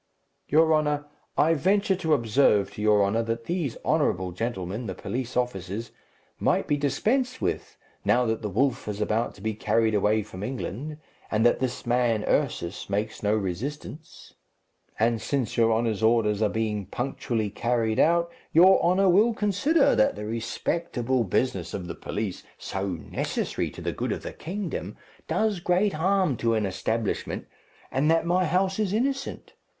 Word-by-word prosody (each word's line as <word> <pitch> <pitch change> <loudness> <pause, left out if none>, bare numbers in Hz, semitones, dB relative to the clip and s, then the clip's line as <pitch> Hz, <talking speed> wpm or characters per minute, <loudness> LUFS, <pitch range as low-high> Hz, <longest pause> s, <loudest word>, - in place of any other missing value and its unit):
"Your 160 +2 +4
honour, 150 -1 +1 0.3
I 160 +2 +4
venture 195 +5 +2
to 160 -4 +2
observe 110 -5 +2
to - - -7
your 105 -1 +4
honour 105 +4 +1
that 115 0 -3
these 165 -4 -2
honourable 95 - +1
gentlemen, 105 +2 -4
the - - -4
police 125 0 -4
officers, 110 -2 -2 0.5
might - - +2
be 145 - +1
dispensed 230 - 0
with, - - -3 0.3
now 125 0 +3
that 110 -1 -1
the 105 - -3
wolf 125 +5 0
is 105 -1 -4
about 110 +2 0
to 100 - -15
be 110 +1 -1
carried 110 +1 +1
away 105 +1 +2
from 95 -2 -10
England, 130 +5 -4 0.3
and 110 +1 +1
that 120 - +4
this 130 -1 -3
man, 120 -3 +2
Ursus, 85 +4 -1
makes 105 +2 -2
no 105 +1 +2
resistance; 130 - -5 0.6
and 115 0 +1
since 135 -6 -1
your 115 -1 +4
honour's 110 -2 0
orders 110 -2 +3
are 105 - +3
being 105 -3 -2
punctually 120 -2 -2
carried 115 0 0
out, 170 +1 +3 0.2
your 185 +4 +6
honour 185 +3 +3
will 210 +6 +4
consider 215 - +3
that 105 - +3
the 105 +1 -6
respectable 120 +2 -1
business 95 -3 -1
of 90 - -5
the 85 - -5
police, 105 -3 -4 0.2
so 95 0 -4
necessary 85 -5 -3
to - - -10
the - - -2
good - - -2
of - - -3
the - - -6
kingdom, 190 +3 -5 0.3
does 215 -4 +1
great 180 +4 +2
harm 185 -2 +2
to 115 0 +1
an 110 -2 +1
establishment, 100 +3 -2 0.5
and 140 +4 +1
that 165 0 +3
my 180 +2 +2
house 185 +4 +1
is 205 -3 0
innocent. 270 +4 -2
120 Hz, 165 wpm, -26 LUFS, 105-165 Hz, 0.6 s, your